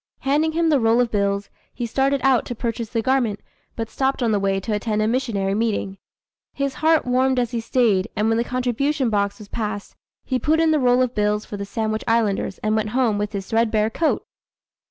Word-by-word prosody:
Handing 300 +4 +1
him 330 0 +2
the 295 -3 +4
roll 225 0 +3
of 245 -2 +1
bills, 200 -1 -1 0.2
he 240 - -4
started 270 +4 +1
out 265 -3 +4
to 245 - -4
purchase 230 -1 -3
the 230 -2 -1
garment, 245 -6 +1 0.4
but 225 -1 -3
stopped 265 +2 -1
on 230 - +2
the 205 - +2
way 195 0 0
to 210 +3 -3
attend 210 0 -1
a 215 - +2
missionary 225 -6 0
meeting. 205 -3 -1 0.5
His 275 -1 -2
heart 320 0 +3
warmed 255 +1 +2
as 245 -2 0
he 235 - -2
stayed, 225 -5 +2
and 210 +2 +1
when 225 0 +2
the - - +2
contribution 255 +2 -1
box 200 -1 0
was 210 - -12
passed, 210 -2 -5 0.3
he 255 -2 -1
put 315 +4 +2
in 325 -1 +3
the 310 - +3
roll 250 -1 +4
of 250 -1 -2
bills 210 -1 0
for - - -7
the 200 0 -5
Sandwich 215 +1 -2
Islanders, 220 -4 +1
and 215 0 +1
went 215 -1 0
home 225 -6 +2
with 210 0 -2
his 195 -1 -4
threadbare 220 -1 +1
coat! 320 +7 0
230 Hz, 215 wpm, -22 LUFS, 210-260 Hz, 0.5 s, the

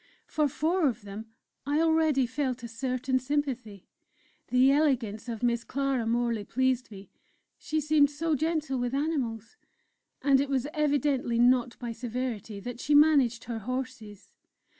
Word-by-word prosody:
For 300 -1 +1
four 315 +5 +1
of 235 -4 -3
them 205 +2 -8 0.4
I 290 +2 0
already 320 -4 +3
felt 255 -1 -3
a - - -4
certain 255 +2 -1
sympathy; 255 -7 -3 0.6
the 255 +2 +4
elegance 250 -7 0
of 230 0 -5
Miss 235 -1 +1
Clara 270 -3 -1
Morley 235 -2 0
pleased 255 +3 0
me; 200 -2 -12 0.5
she 310 - -2
seemed 300 -1 +3
so 315 +3 -2
gentle 310 -3 -1
with 245 +1 -1
animals, 275 - -2 0.7
and 275 -1 +4
it 280 - -2
was 265 -2 0
evidently 290 -5 +1
not 245 0 +3
by 240 -2 -5
severity 230 -3 -4
that 245 +3 -7
she 295 +3 +1
managed 280 -6 +4
her 230 -1 -5
horses. 250 -3 -6
255 Hz, 145 wpm, -28 LUFS, 235-290 Hz, 0.7 s, the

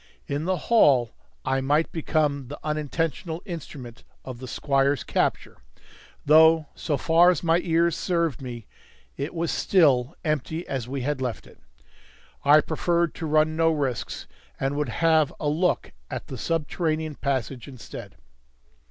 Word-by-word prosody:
In 145 +3 -3
the 185 0 +1
hall 135 - +4 0.3
I 135 0 +1
might 145 +4 +1
become 150 -4 0
the 145 - -7
unintentional 160 +2 -2
instrument 140 - -8 0.2
of 125 -2 -7
the 130 - -8
squire's 135 0 +1
capture, - - -1 0.6
though, 160 +1 +6
so 150 -4 -2
far 165 +5 +5
as 180 -3 0
my 165 0 +3
ears 170 -1 +1
served 170 -7 -1
me, 120 -4 -7 0.5
it 140 +3 -4
was 165 0 -1
still 145 -6 +3
empty 155 +2 -2
as 130 -4 -3
we 135 0 -3
had 140 +1 -2
left 125 -3 -3
it. - - -18 0.8
I 150 +2 +7
preferred 170 +2 0
to 165 - -5
run 155 +1 +2
no 165 0 +3
risks, 135 -8 -3 0.3
and 135 +1 -1
would 145 -3 -1
have 160 +2 +3
a 150 - -2
look 170 +5 0 0.2
at - - -5
the 130 - -7
subterranean 160 - -1
passage 135 -3 -3
instead. 130 -4 -10
150 Hz, 145 wpm, -25 LUFS, 135-165 Hz, 0.8 s, I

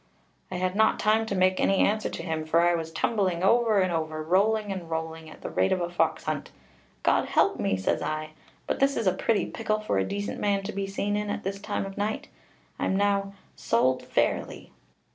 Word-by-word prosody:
I 185 - -5
had 185 +1 -1
not 220 +1 +4
time 220 +1 +2
to 200 - -2
make 185 0 +3
any 195 - +3
answer 215 +2 +2
to - - -6
him, 160 -2 -2
for 160 +2 +3
I 175 0 +4
was 165 -1 -3
tumbling 185 -1 0
over 225 0 +4
and 185 -2 +1
over, 155 -1 -2
and 160 - -12
rolling 210 +2 +3
and 180 -4 -5
rolling, 160 0 -4
at - - -14
the - - -5
rate 95 +1 +2
of 185 - +2
a 175 0 -2
fox 160 -2 0
hunt. 155 -2 -3 0.5
'God - - +3
help - - +2
me!' 95 - +1
says 95 - 0
I, 155 0 -3 0.3
'but - - -2
this 275 +1 +2
is 230 - -1
a 185 - +4
pretty 225 -3 +1
pickle 215 -1 -2
for 215 - 0
a - - +2
decent 205 - -4
man 200 -1 +1
to 205 - -4
be 195 0 -2
seen 200 +1 -1
in 210 0 -2
at - - -3
this 195 +1 -3
time - - -2
of 195 +1 -7
night: 210 +2 -2 0.5
I - - 0
am - - +1
now 200 0 +1 0.2
sold 130 +3 +1
fairly.' - - -1
190 Hz, 225 wpm, -27 LUFS, 160-205 Hz, 0.5 s, not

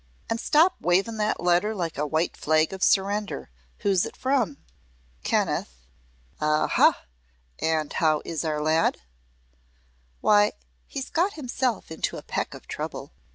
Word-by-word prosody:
"An' 225 - 0
stop 320 +8 +4
wavin' 195 +6 +2
that 215 0 0
letter 180 +5 +2
like 170 -4 -3
a 150 +1 -1
white 160 +3 0
flag 155 +3 +2
of 190 - -7
surrender. 200 - +1 0.3
Who's 195 -3 +2
it - - -6
from?" 255 - 0 0.6
"Kenneth." - - 0 0.7
"Aha! 155 0 +3 0.6
An' 160 -2 0
how 155 -2 +2
is 165 -1 -3
our 155 -2 -1
lad?" 160 +1 +2 1.2
"Why, 210 0 +4 0.3
he's 270 -2 -6
got 365 +5 +1
himself 255 - -2
into 160 - -2
a - - -8
peck - - -3
of - - -13
trouble. - - -5
180 Hz, 135 wpm, -26 LUFS, 155-220 Hz, 1.2 s, stop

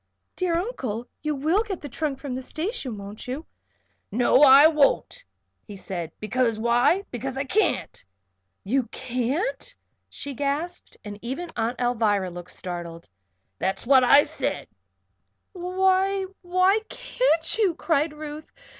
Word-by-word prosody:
"Dear 355 -2 0
Uncle! 255 - -4
You 305 -1 -1
will 315 +9 +2
get 410 -5 -4
the 290 - -6
trunk 290 +1 -3
from 275 -2 -6
the 255 - -3
station, 310 - -4
won't 200 +3 -8
you?" 270 +6 -5 0.7
"No 245 +5 +4
I 280 0 +9
won't," 315 - +2 0.4
he 205 - -8
said. 180 -4 -5
"Because 230 +1 0
why? 240 - +3
Because 260 +2 -4
I 270 - 0
can't." 370 - 0 0.6
"You 250 +4 0
can't?" 260 - -3 0.3
she 280 - -6
gasped, 290 +6 -3
and 205 0 -7
even 280 +9 -5
Aunt 230 +2 -1
Alvirah 220 -6 +1
looked 175 0 -9
startled. 170 -2 -7 0.5
"That's 190 +3 -2
what 260 0 +6
I 280 +4 +7
said." - - -3 0.9
"Why 380 +1 +1 0.2
why 370 +3 +3
can't - - +1
you?" 385 -6 +3
cried 315 -2 +1
Ruth. 300 0 -8
275 Hz, 135 wpm, -25 LUFS, 235-350 Hz, 0.9 s, I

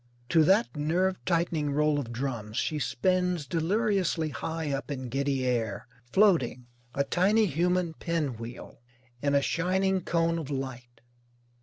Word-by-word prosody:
To 160 -2 +5
that 195 +3 +3
nerve 175 +5 0
tightening 165 -4 0
roll 150 0 +2
of 120 -4 -5
drums 120 -3 -4
she 155 +2 0
spins 180 +3 0
deliriously 175 - 0
high 155 +4 -3
up 140 +1 -3
in 130 -3 -4
giddy 135 0 0
air, 115 -5 -1 0.2
floating, 165 - +3 0.3
a 140 - +2
tiny 200 +9 +3
human 175 +1 0
pin 160 -6 -2
wheel, 115 +1 -9 0.4
in 145 0 +1
a 140 - +3
shining 190 +3 +1
cone 165 0 +1
of 150 -4 -6
light. 130 -3 -6
155 Hz, 140 wpm, -28 LUFS, 135-180 Hz, 0.4 s, To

